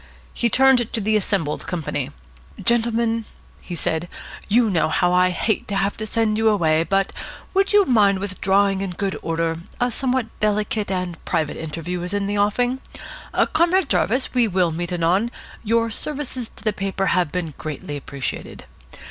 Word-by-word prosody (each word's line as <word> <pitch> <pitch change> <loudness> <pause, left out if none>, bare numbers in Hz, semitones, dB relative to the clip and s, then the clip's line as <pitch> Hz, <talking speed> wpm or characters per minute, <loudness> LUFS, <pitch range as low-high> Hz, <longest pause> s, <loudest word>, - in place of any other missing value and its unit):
He 235 - +1
turned 260 -2 +4
to - - +1
the 215 +1 +1
assembled 190 -8 -1
company. 150 -5 -2 0.5
"Gentlemen," 230 -1 +1 0.4
he 175 - -6
said, 160 +2 -1 0.4
"you 230 +2 +4
know 180 -7 +2
how 180 +3 +2
I 180 0 +5
hate 190 +4 -1
to 205 - -3
have 195 +1 +1
to 215 - -4
send 220 -1 +1
you 220 0 +4
away, 160 -6 +3
but 195 +3 0 0.4
would 390 0 +2
you 410 -1 +6
mind 205 - +4
withdrawing 195 0 +1
in 195 -2 -3
good 195 -1 -1
order? 165 0 -1 0.2
A 245 0 +1
somewhat 255 0 0
delicate 210 0 0
and 180 -3 -3
private 160 -4 -1
interview 165 +3 -4
is 180 +3 -2
in 200 -1 0
the 205 +1 -1
offing. 245 +5 +1 0.7
Comrade 345 +2 +3
Jarvis, 220 +8 +1
we 245 -3 +3
will 180 -4 +2
meet 175 +2 -3
anon. 180 +6 +2 0.3
Your 230 +1 +1
services 260 -2 -4
to - - -13
the 215 -1 +1
paper 195 -1 -2
have 175 -4 +1
been 170 -4 -3
greatly 150 -1 -5
appreciated. 140 -1 -5
200 Hz, 165 wpm, -22 LUFS, 175-230 Hz, 0.7 s, you